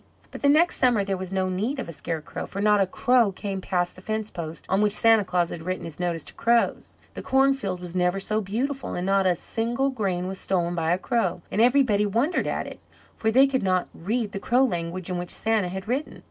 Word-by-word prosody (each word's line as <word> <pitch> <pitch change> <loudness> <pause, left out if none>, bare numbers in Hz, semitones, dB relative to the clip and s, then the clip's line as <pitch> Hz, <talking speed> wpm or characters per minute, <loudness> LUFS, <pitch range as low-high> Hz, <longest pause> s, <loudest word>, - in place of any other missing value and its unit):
But - - -9
the 280 - +4
next 320 +4 +4
summer 245 -6 +3
there 195 0 -1
was 185 0 -6
no 190 -1 0
need 210 +10 -2
of 260 - -4
a - - -6
scarecrow, 160 +1 -5
for 195 - -7
not 210 0 +4
a 195 - +2
crow 245 +1 +3
came 195 0 -5
past 180 -1 -1
the 185 - -13
fence 215 +1 -3
post 165 -1 -7
on 190 +2 +1
which 210 -1 +4
Santa 225 -1 +5
Claus 180 -2 0
had 165 - -6
written 185 +2 -4
his 165 -1 -7
notice 170 -3 -1
to - - -9
crows. 235 0 +1 0.2
The - - -6
cornfield 265 -8 +1
was 175 -1 -8
never 180 +1 +1
so 215 +2 -1
beautiful, 255 +8 -3
and 180 - -3
not 195 0 +2
a 180 - +3
single 240 +9 -1
grain 190 -7 -2
was 190 0 -5
stolen 175 -2 -1
by 165 -1 0
a 175 - +3
crow, 185 -5 -1
and 210 - +1
everybody 240 -5 +4
wondered 240 - 0
at - - -2
it, - - -9 0.4
for 220 - 0
they 260 +5 +6
could 270 -1 0
not 185 -2 0
read 215 +5 -2
the 195 - -4
crow 245 +6 +2
language 175 -5 -2
in 180 - -2
which 175 0 -5
Santa 220 -4 +1
had 190 +2 -6
written. 265 +6 -3
195 Hz, 235 wpm, -25 LUFS, 180-235 Hz, 0.4 s, they